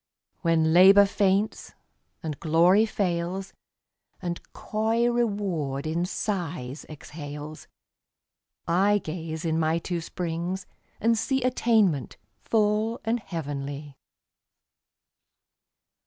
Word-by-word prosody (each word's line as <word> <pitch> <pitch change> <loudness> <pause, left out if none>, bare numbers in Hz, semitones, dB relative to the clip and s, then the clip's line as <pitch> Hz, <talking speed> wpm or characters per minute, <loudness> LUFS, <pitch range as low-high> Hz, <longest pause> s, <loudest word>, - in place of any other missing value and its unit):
When 160 -2 +2
Labor 195 +3 +8
faints, 200 +2 0 0.5
and 155 -3 -4
Glory 175 +7 +4
fails, 185 -1 -2 0.7
And 175 -1 -4
coy 225 +2 0
Reward 195 - -1
in 165 +3 0
sighs 165 - -4
exhales, 150 0 -8 1.0
I 195 +5 +3
gaze 160 -3 -5
in 160 0 +1
my 160 +1 +2
two 170 0 -3
springs 175 +2 -4 0.3
and 230 +1 +3
see 240 +4 0
Attainment 220 - +2 0.2
full 215 +1 +1
and 230 +2 +1
heavenly. 145 -5 -5
175 Hz, 90 wpm, -26 LUFS, 160-210 Hz, 1.0 s, Labor